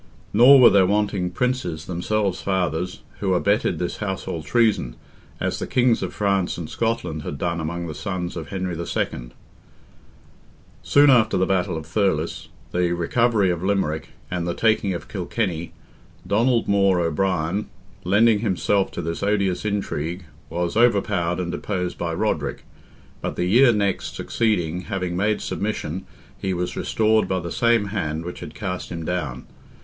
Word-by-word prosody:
Nor 125 +6 +8
were 125 - +9
there 95 -2 +5
wanting 100 -2 0
Princes, 90 -7 -2
themselves 95 +2 -1
fathers, 90 0 -1 0.2
who 95 -2 +1
abetted 100 -2 +1
this 90 +1 -3
household 95 -6 -4
treason, 90 - +2 0.4
as - - -2
the - - -4
Kings 125 -2 +2
of - - -3
France 100 -3 0
and 85 -3 -5
Scotland 90 -9 -2
had 70 - -5
done 85 +3 -1
among 85 +2 -3
the 80 - -5
sons 90 -1 -4
of 80 -3 -5
Henry 95 -2 -3
II. 70 -7 -3 1.5
Soon 145 0 +5
after 110 -4 +4
the 95 - +2
battle 90 -4 0
of 80 - -7
Thurles, 85 -2 -1 0.2
the 90 -1 +1
recovery 100 +3 +2
of 85 -1 -3
Limerick, 85 -5 0 0.2
and 90 -1 -2
the 85 - -2
taking 110 -3 +2
of - - -7
Kilkenny, 90 -3 -3 0.5
Donald 115 +5 +2
More 100 -2 +3
O'Brien, 85 +3 0 0.3
lending 105 +4 +4
himself 100 -1 +1
to - - -4
this 85 +1 -3
odious 100 -2 0
intrigue, 90 -4 -2 0.2
was 85 +1 -2
overpowered 100 -7 +2
and 85 -1 -2
deposed 90 -2 -3
by 85 -1 -2
Roderick, - - -2 0.6
but - - -3
the 90 - -1
year 120 +7 +6
next 100 -3 -1
succeeding 90 -7 0
having 90 -4 -3
made 105 +3 +1
submission 95 -4 -3 0.3
he 95 -1 -1
was 90 0 -3
restored 110 0 +2
by 95 - 0
the 85 -1 -6
same 115 -3 +2
hand 80 -5 -3
which 90 - -6
had 85 -3 -9
cast 90 -3 -4
him 85 -2 -5
down. 90 -4 -3
95 Hz, 155 wpm, -23 LUFS, 85-105 Hz, 1.5 s, were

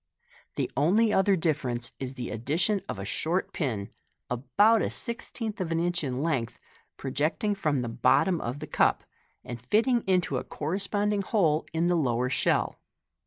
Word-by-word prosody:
The - - -2
only 210 +10 +3
other 195 +1 +4
difference 135 -8 -1
is 130 0 -5
the 125 -2 -5
addition 165 - 0
of - - -3
a - - -5
short 175 +4 -1
pin, 110 - -2 0.4
about 205 - +3
a - - 0
sixteenth 230 -3 -4
of 170 -3 -2
an 165 - +1
inch 175 0 0
in 130 0 -2
length, 135 -8 -1 0.4
projecting 150 +10 -1
from 150 -10 0
the - - -3
bottom 130 +9 +2
of 120 +4 -3
the - - -4
cup, - - +2 0.4
and 120 -2 -7
fitting 230 - +2
into 180 -8 +2
a - - -3
corresponding 200 +5 -1
hole 170 -7 +1
in 165 +1 0
the 175 0 +3
lower 125 -5 +1
shell. - - +1
165 Hz, 165 wpm, -28 LUFS, 130-200 Hz, 0.4 s, other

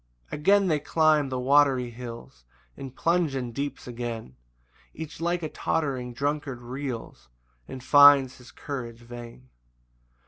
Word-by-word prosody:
3 - - -5
[Again 200 +5 +4
they 155 -4 +2
climb 155 -1 +2
the 130 - -3
watery 130 -1 +3
hills, 115 - -10 0.3
And 135 -1 -9
plunge 170 -4 +1
in 125 -2 -3
deeps 140 +2 -5
again; 115 - -6 0.6
Each 160 +1 -8
like 170 0 -1
a - - -1
tottering 135 -8 -2
drunkard 140 0 -3
reels, 125 - -6 0.4
And 130 -1 -8
finds 145 -2 +6
his 125 - -15
courage 120 -5 -7
vain. 120 +1 -11
135 Hz, 135 wpm, -26 LUFS, 120-145 Hz, 0.6 s, finds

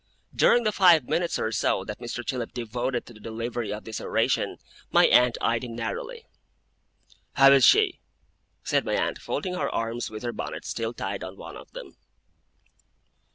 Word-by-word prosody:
During 240 - +4
the 215 - +1
five 175 -7 +5
minutes 170 0 0
or 110 - -2
so 95 - 0
that 105 - -7
Mr. 120 0 -6
Chillip 125 -3 -4
devoted 120 +1 -3
to 120 - -13
the 110 - -15
delivery 115 +1 -4
of 105 - -5
this 110 -2 -6
oration, - - 0 0.3
my - - +5
aunt 125 -1 +4
eyed 115 +1 0
him 120 -2 -6
narrowly. 475 - -5 1.1
'How 135 0 +7
is 135 -2 +6
she?' 420 -4 +5 0.6
said - - +1
my - - -1
aunt, - - -1
folding 185 -2 -3
her 180 - -1
arms 115 +1 -3
with 110 +1 -8
her 120 -1 -3
bonnet - - -6
still 115 +1 -3
tied 100 +1 -4
on 95 +1 -8
one - - -10
of - - -12
them. - - -10
120 Hz, 175 wpm, -26 LUFS, 115-160 Hz, 1.1 s, How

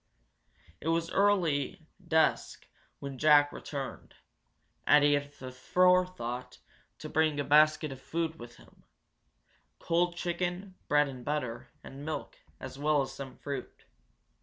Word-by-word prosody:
It - - -7
was 165 0 0
early 175 -5 +1 0.2
dusk 160 -1 +1 0.3
when 140 -2 -7
Jack 145 -1 +6
returned, 140 -3 -7 0.7
and 150 - +6
he 145 0 +5
had 145 0 -1
the 130 -2 -9
forethought 130 -5 +1 0.4
to - - -8
bring 155 -2 +1
a - - +1
basket 155 +1 +4
of 135 -1 -9
food 160 +1 -3
with 120 0 -10
him - - -20 0.9
cold 175 +1 0
chicken, 180 +2 -3
bread 145 0 +3
and 130 -2 -8
butter, 135 -6 -3 0.2
and 135 +1 -10
milk, 155 +1 -5 0.2
as 135 - -8
well 150 -1 +2
as 135 - -7
some 135 -2 -9
fruit. 140 -3 -7
150 Hz, 135 wpm, -30 LUFS, 135-165 Hz, 0.9 s, Jack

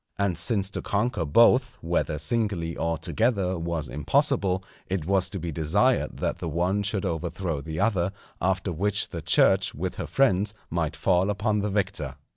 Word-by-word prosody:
And 100 -3 +1
since 95 +4 +1
to - - -3
conquer 105 -3 -1
both, 125 - +4
whether 85 -2 -1
singly 85 0 -1
or 85 0 -1
together, 100 -6 0
was 80 -3 -2
impossible, 90 +7 +1 0.2
it 95 -4 -2
was 95 -1 +2
to 100 - -4
be 85 -1 -4
desired 95 - +1
that - - -2
the 85 - -3
one 90 +5 0
should 100 0 -1
overthrow 85 -2 -2
the 80 +2 -5
other, 95 -5 +1 0.3
after 95 +1 0
which 100 +5 0
the - - -5
Church - - +3
with - - -3
her - - -4
friends 105 -6 +2 0.2
might 80 -2 -1
fall 90 +3 +2
upon 105 +1 0
the 105 +1 -1
victor. 95 -9 -2
95 Hz, 170 wpm, -26 LUFS, 85-105 Hz, 0.3 s, both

